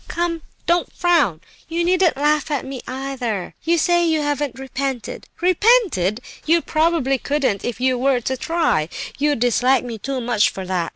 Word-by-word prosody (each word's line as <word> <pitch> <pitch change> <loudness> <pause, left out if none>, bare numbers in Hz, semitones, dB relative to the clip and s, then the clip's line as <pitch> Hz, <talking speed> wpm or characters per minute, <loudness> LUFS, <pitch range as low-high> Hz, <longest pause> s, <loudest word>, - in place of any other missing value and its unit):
Come, 340 -1 -2 0.2
don't 345 0 +1
frown; 320 - +2 0.3
you 335 +1 -1
needn't 355 -4 +2
laugh 295 +2 +1
at 285 -4 -2
me, 265 -2 -6
either. 255 -7 -4
You 340 +1 +2
say 345 +1 +3
you 320 -2 +1
haven't 290 -3 -2
'repented.' 270 -2 -4
Repented! 360 - +3 0.2
You 330 +2 +2
probably 310 -5 +1
couldn't, 275 -9 -1
if 245 -1 -4
you 255 -1 +1
were 265 0 +2
to 260 +3 -2
try; 320 - 0 0.3
you 295 0 +2
dislike 245 +2 +2
me 230 -3 -6
too 270 +4 -3
much 235 -3 +2
for 190 - -7
that. 180 -3 -1
275 Hz, 165 wpm, -20 LUFS, 245-330 Hz, 0.3 s, say